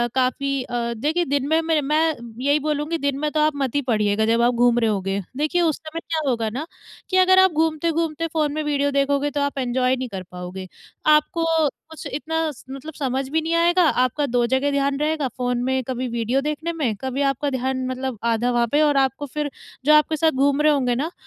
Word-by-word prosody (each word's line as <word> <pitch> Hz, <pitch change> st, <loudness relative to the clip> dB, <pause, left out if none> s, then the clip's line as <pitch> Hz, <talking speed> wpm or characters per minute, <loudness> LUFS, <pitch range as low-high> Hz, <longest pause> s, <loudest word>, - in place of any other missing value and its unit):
काफ़ी 270 Hz, +1 st, 0 dB
अ, 235 Hz, -1 st, -3 dB
देखिए 340 Hz, +3 st, +1 dB
दिन 280 Hz, -2 st, -1 dB
में, 320 Hz, 0 st, +2 dB
मैं 310 Hz, +3 st, +1 dB, 0.3 s
यही 285 Hz, +2 st, +3 dB
बोलूँगी 300 Hz, +2 st, -1 dB
दिन 280 Hz, -1 st, 0 dB
में 300 Hz, +1 st, 0 dB
तो 310 Hz, -, 0 dB
आप 305 Hz, -1 st, +2 dB
मत 270 Hz, -3 st, -2 dB
ही 285 Hz, -, +2 dB
पढ़िएगा, 210 Hz, -1 st, +2 dB
जब 230 Hz, +1 st, +2 dB
आप 240 Hz, +1 st, +3 dB
घूम 240 Hz, 0 st, +3 dB
रहे 225 Hz, -2 st, +2 dB
होंगे। 195 Hz, -1 st, -1 dB, 0.2 s
देखिए 310 Hz, +4 st, +1 dB
उस 320 Hz, -4 st, +1 dB
समय 315 Hz, +1 st, -7 dB
क्या 325 Hz, -1 st, -2 dB
होगा 230 Hz, -3 st, 0 dB
ना, 260 Hz, +8 st, -5 dB, 0.4 s
कि 375 Hz, -, +1 dB
अगर 375 Hz, 0 st, +6 dB
आप 380 Hz, -1 st, +5 dB
घूमते-घूमते 325 Hz, 0 st, 0 dB
फ़ोन 305 Hz, -3 st, 0 dB
में 310 Hz, 0 st, -2 dB
वीडियो 285 Hz, -1 st, 0 dB
देखोगे, 280 Hz, +1 st, +1 dB
तो 285 Hz, -, -2 dB
आप 285 Hz, 0 st, -2 dB
एन्जॉय 255 Hz, 0 st, +1 dB
नहीं 260 Hz, 0 st, -4 dB
कर 190 Hz, -3 st, -6 dB
पाओगे। 180 Hz, +1 st, -7 dB, 0.5 s
आपको 330 Hz, +2 st, 0 dB, 0.4 s
कुछ 320 Hz, -, -10 dB
इतना 320 Hz, +2 st, -1 dB
स 275 Hz, -, -15 dB
मतलब 275 Hz, +4 st, -8 dB
समझ 265 Hz, -1 st, -2 dB
भी 320 Hz, +3 st, +1 dB
नहीं 325 Hz, +1 st, -2 dB
आएगा, 345 Hz, +2 st, +4 dB
आपका 255 Hz, +3 st, +1 dB
2 245 Hz, -2 st, +1 dB
जगह 265 Hz, +3 st, +1 dB
ध्यान 280 Hz, 0 st, 0 dB
रहेगा 305 Hz, -2 st, 0 dB
फ़ोन 245 Hz, -1 st, -1 dB
में 260 Hz, 0 st, 0 dB
कभी 255 Hz, +1 st, -3 dB
वीडियो 235 Hz, +3 st, 0 dB
देखने 300 Hz, +3 st, -3 dB
में, 275 Hz, -10 st, -1 dB
कभी 265 Hz, +1 st, -2 dB
आपका 275 Hz, +2 st, -1 dB
ध्यान 260 Hz, 0 st, -2 dB
मतलब 255 Hz, -2 st, -4 dB
आधा 240 Hz, +2 st, 0 dB
वहाँ 240 Hz, -1 st, +2 dB
पे 295 Hz, -, +3 dB
और 295 Hz, -2 st, +3 dB
आपको 270 Hz, +1 st, +1 dB
फिर 295 Hz, +1 st, -3 dB, 0.4 s
जो 305 Hz, -, +6 dB
आपके 305 Hz, +1 st, +4 dB
साथ 320 Hz, +1 st, +3 dB
घूम 280 Hz, +1 st, +2 dB
रहे 305 Hz, 0 st, +5 dB
होंगे 250 Hz, -4 st, +1 dB
ना, 300 Hz, +7 st, -2 dB
280 Hz, 215 wpm, -22 LUFS, 250-310 Hz, 0.5 s, अगर